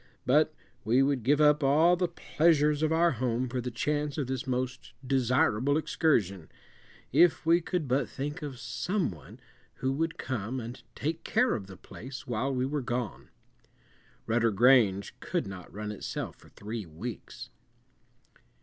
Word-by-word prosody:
But - - +4 0.3
we 125 +5 +3
would 135 -2 +1
give 140 +6 +3
up 150 0 +5
all 155 +6 +5
the 180 0 0
pleasures 150 -3 +2
of 155 0 +2
our 170 +1 +4
home 125 0 -1
for 125 +1 -3
the 125 - -3
chance 145 +4 -2
of 145 - 0
this 130 0 -4
most 130 -1 -3
desirable 130 +1 +2
excursion, 105 - 0 0.6
if 175 -2 +4
we 170 +2 +4
could 170 -3 -2
but 130 +1 +1
think 145 +5 -5
of 145 -4 -6
some 120 - -2
one 80 -5 -13 0.4
who 130 - -1
would 165 +3 -2
come 130 0 -3
and 120 +1 -7
take 160 +3 -3
care - - +2
of 105 -5 -4
the 95 -2 -11
place 130 +7 -9
while 120 +3 -1
we 130 -1 0
were 145 +2 -2
gone. 120 -3 -4 1.0
Rudder 115 0 +2
Grange 105 -3 +4
could - - -2
not 95 -2 -9
run 105 +1 -5
itself 105 - -5
for - - -19
three 105 -1 -6
weeks. 95 +8 -8
130 Hz, 160 wpm, -29 LUFS, 115-150 Hz, 1.0 s, up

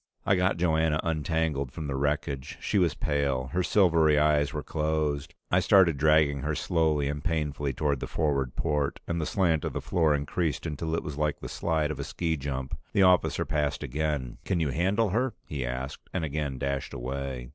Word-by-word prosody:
I 100 - +4
got 90 0 +1
Joanna 80 -2 +2
untangled 80 -4 -1
from 80 +3 -6
the 70 - -3
wreckage. 70 -1 -2
She 100 - 0
was 85 -4 +2
pale; 70 -3 -1
her 90 - +2
silvery 85 -6 +4
eyes 75 -1 +3
were 75 0 -4
closed. 75 -2 -1 0.2
I - - +5
started 85 -7 +4
dragging 75 -1 +4
her 75 +3 -2
slowly 80 -5 +1
and 75 +1 -3
painfully 75 -4 -1
toward 70 +1 0
the - - -4
forward 70 -5 -1
port, 75 -3 -1
and 85 -1 -1
the 75 - -2
slant 80 -3 +1
of - - -3
the - - -2
floor 80 -4 +2
increased 75 +1 -2
until 80 +1 -2
it - - -2
was 75 -2 -6
like 75 -1 0
the - - -6
slide 80 -2 -1
of 75 - -6
a - - -2
ski 80 +3 -2
jump. 65 -2 -4 0.2
The 100 - +4
officer 90 -1 +3
passed 75 -2 -1
again. 75 -2 -2
"Can 90 - 0
you 80 -3 +1
handle 95 - +1
her?" 115 +5 0
he 70 -4 -4
asked, 65 +2 -5
and 85 -4 -1
again 70 -2 -3
dashed 70 0 -3
away. 65 0 -4
75 Hz, 195 wpm, -28 LUFS, 70-80 Hz, 0.2 s, I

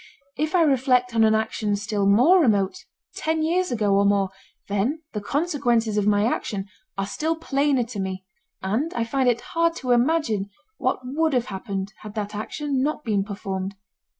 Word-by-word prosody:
If 310 +4 -1
I 345 - +5
reflect 255 -4 +2
on 225 -1 +4
an 220 0 +5
action 220 -1 0
still 205 -1 -1
more 255 - +6
remote, 210 - +1 0.3
ten 320 0 -1
years 360 +3 +1
ago 210 -4 +1
or 200 +1 +4
more, 200 -1 +2 0.4
then 225 +11 -1
the 210 - -3
consequences 240 -5 0
of 210 -1 +1
my 205 0 +3
action 205 -4 -2 0.3
are 195 - 0
still 315 +10 -1
plainer 280 -4 +1
to 230 -3 -7
me 190 -1 -4 0.4
and 230 - 0
I 235 - +1
find 255 +2 +1
it 240 0 +1
hard 335 0 +2
to 255 -6 -2
imagine 240 -6 +2 0.3
what - - 0
would 305 +5 0
have 245 -2 +2
happened 195 +1 -4
had 215 0 -10
that 210 -1 -3
action 270 +6 -2
not 300 +2 -1
been 205 -4 +1
performed. 195 -1 -4
230 Hz, 175 wpm, -24 LUFS, 205-290 Hz, 0.4 s, more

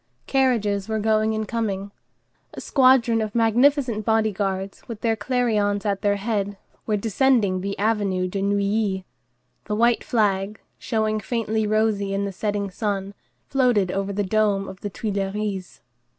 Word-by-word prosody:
Carriages 225 -7 +1
were 220 - 0
going 220 0 +1
and 215 0 -2
coming. 200 -4 -2 0.6
A - - -6
squadron 255 -4 +4
of 215 0 -4
magnificent 235 0 +3
body 220 0 +2
guards, 195 -1 -3
with 225 -3 -7
their 225 -1 +1
clarions 215 -3 0
at 200 -2 0
their 205 -1 +2
head, 205 -1 -2 0.3
were 215 -2 +1
descending 215 -3 +2
the 200 +1 -3
Avenue 200 -3 0
de 195 +2 -3
Neuilly; 200 -1 0 0.6
the 210 - -2
white 235 +2 +3
flag, 205 -2 0 0.2
showing 220 -2 0
faintly 220 0 -1
rosy 210 -2 +1
in 200 0 -1
the 200 - -3
setting 205 0 -2
sun, 200 -1 -3 0.3
floated 245 -9 +2
over 195 +1 -2
the 205 +1 -1
dome 200 -1 +1
of 190 0 -9
the 205 - -4
Tuileries. 200 -1 -3
210 Hz, 150 wpm, -23 LUFS, 200-225 Hz, 0.6 s, squadron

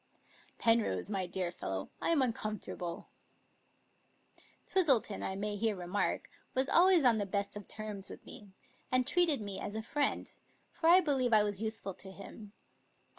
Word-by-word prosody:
" - - -27
Penrose, 225 - +2
my 190 -3 -1
dear 180 -1 -2
fellow, 95 - -5
I'm 325 -5 +3
uncomfortable." 215 -7 -4 1.6
Twistleton, 270 - +2
I 190 - -2
may 205 +1 -3
here 220 0 +1
remark, 180 +2 -2 0.3
was 260 +1 +2
always 360 -2 +5
on 235 -4 +5
the 205 - -1
best 200 +1 -2
of 205 -2 -8
terms 210 -3 -6
with - - -11
me, 205 - -11 0.4
and 255 0 +3
treated 320 -3 +3
me 200 -2 -4
as 205 - -5
a 220 - -3
friend, 285 +4 -1 0.4
for 325 - +1
I 365 +2 +8
believe 265 -7 +1
I 215 -1 +6
was 205 -1 -2
useful 220 -3 -3
to 190 +1 -10
him. 200 +2 -11
215 Hz, 160 wpm, -33 LUFS, 195-255 Hz, 1.6 s, I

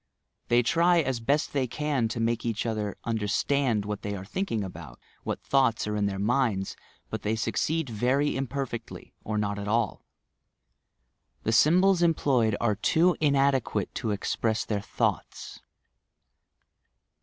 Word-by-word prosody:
They 120 +1 +4
try 170 +7 +3
as 135 -4 -2
best 140 +6 0
they 135 -3 +1
can 145 -2 -1
to 115 +1 -4
make 115 0 0
each 115 -1 -2
other 110 -3 -2
understand 115 +1 0
what 105 -1 -4
they 100 0 -3
are 95 -1 -7
thinking 115 - -2
about, 80 -9 -9 0.2
what - - -4
thoughts 130 -4 +2
are 105 0 -2
in 105 -1 +1
their 95 -1 -3
minds, 105 -2 0 0.4
but - - -3
they 110 +2 0
succeed 155 +7 -1
very 125 +6 +1
imperfectly, 135 -3 -5
or 110 0 -2
not 100 -1 -1
at 100 - -5
all! 110 -1 0 1.4
The 110 - 0
symbols 175 - +4
employed 135 -10 +2
are 120 -3 +2
too 165 - +2
inadequate 135 -7 +1
to 115 - -3
express 110 +2 -1
their 105 -2 -2
thoughts. - - -3
115 Hz, 145 wpm, -27 LUFS, 105-140 Hz, 1.4 s, They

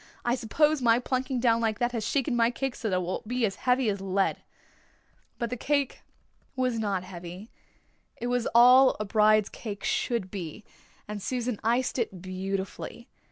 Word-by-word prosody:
"I 240 - +2
suppose 295 +5 +2
my 230 -1 +5
plunking 255 +1 -1
down 230 -2 +3
like 220 -2 0
that 240 0 0
has 230 -3 -3
shaken 265 +1 0
my 230 -1 +4
cake 270 +1 -3
so 220 - -4
that 185 - +1
it 185 - +1
will 180 +2 -3
be 245 0 +1
as 195 - -3
heavy 250 -1 +3
as 200 -2 -1
lead." 195 0 0 1.0
But 235 -1 -3
the - - -1
cake 280 +2 -1 0.5
was 255 -3 0
not 200 -4 -1
heavy. 180 +3 -9 0.7
It 240 - -5
was 245 -1 0
all 250 +2 +7
a 210 - -2
bride's 215 0 +4
cake 205 -4 -7
should 230 -7 -1
be, 185 0 -6 0.4
and 210 -1 -5
Susan 245 -1 -2
iced 245 +3 +1
it 195 -6 -2
beautifully. 190 +5 -5
230 Hz, 175 wpm, -28 LUFS, 200-250 Hz, 1.0 s, all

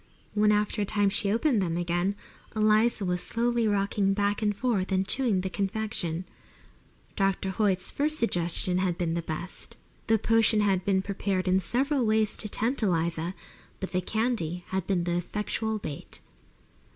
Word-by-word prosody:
When 210 0 +4
after 210 0 +1
a - - +3
time 205 0 +2
she 200 0 0
opened 235 0 +2
them 170 -2 -1
again 175 +3 0 0.4
Eliza 215 0 +3
was 180 0 0
slowly 235 0 +1
rocking 200 -1 +1
back 205 +1 0
and 205 -2 0
forth 210 -7 0
and 190 0 +1
chewing 230 -8 +2
the 190 - -3
confection. 195 -4 -2 0.9
Dr. 195 -1 0
Hoyt's 190 -2 0
first 305 +2 0
suggestion 180 - +1
had 180 -2 0
been 170 -2 -1
best. 170 +1 -5 0.3
The 225 - +4
potion 225 0 +3
had 195 -3 +2
been 190 -1 +1
prepared 195 -1 -2
in 185 +1 +4
several 265 - 0
ways 215 -1 +2
to 210 - -1
tempt 240 +7 -1
Eliza, 170 -2 0 0.4
but 190 - -5
the 185 - 0
candy 180 -5 -1
had 190 -2 -2
been 185 -3 +1
the 175 0 0
effectual 215 +4 -2
bait. 150 -8 -7
200 Hz, 160 wpm, -28 LUFS, 180-220 Hz, 0.9 s, When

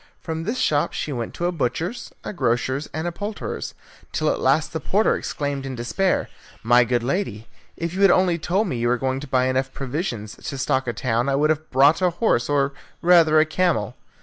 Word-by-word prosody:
From 160 0 -5
this 230 +6 -2
shop 150 -10 +1
she 150 - -3
went 120 -3 -4
to 175 - -2
a 175 - +1
butcher's, 165 - -3
a - - -5
grocer's, 130 - -1
and 160 +2 -4
a 175 - -1
poulterer's, 205 +4 -5 0.4
till - - +1
at - - -2
last - - +2
the - - -2
porter - - +2
exclaimed 140 -2 -3
in 135 -1 -5
despair, 120 +11 0 0.4
"My 120 +2 +5
good 120 0 0
lady, 120 - -2 0.3
if 170 0 -3
you 190 - -2
had 195 - +7
only 175 -1 +3
told 190 +7 0
me 145 - -2
you 120 - +1
were 125 +1 +2
going 130 +1 -1
to 145 - -8
buy 130 -1 +2
enough 130 +1 0
provisions 125 - -4
to 140 - -6
stock 130 0 0
a 120 - -1
town, 120 +2 0
I 135 - +2
would 150 +2 +3
have 155 0 -3
brought 140 +6 +4
a 180 - +4
horse, 170 - +1
or 140 -1 +1 0.3
rather 165 -3 +6
a 155 - +5
camel." 160 - 0
145 Hz, 215 wpm, -23 LUFS, 125-175 Hz, 0.4 s, had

